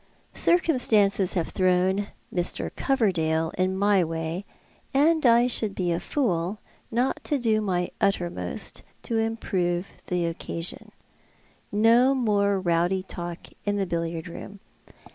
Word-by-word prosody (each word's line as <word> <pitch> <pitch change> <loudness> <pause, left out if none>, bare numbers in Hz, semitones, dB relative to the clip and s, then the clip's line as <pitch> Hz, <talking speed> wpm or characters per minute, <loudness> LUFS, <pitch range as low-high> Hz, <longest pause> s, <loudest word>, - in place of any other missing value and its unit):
Circumstances 220 - +3
have 170 -3 0
thrown 185 +2 +2 0.3
Mr. 175 -1 -2
Coverdale 165 - +1
in 185 +1 0
my 200 -1 +4
way, 165 +3 -3 0.5
and 315 +3 +4
I 235 +1 +6
should 220 -4 0
be 180 -2 0
a 170 - 0
fool 190 - -1 0.3
not 245 +3 0
to 295 - +1
do 220 -4 +1
my 180 -4 -1
uttermost 175 - -1 0.2
to 230 -1 -1
improve 190 -5 -1 0.2
the 180 -1 0
occasion. 165 0 -5 0.8
No 235 +6 +5
more 200 -5 +2
rowdy 175 +1 +1
talk 175 -2 -6 0.2
in 205 0 0
the 195 - 0
billiard 165 -1 -3
room. 195 +4 -9
190 Hz, 125 wpm, -26 LUFS, 175-225 Hz, 0.8 s, I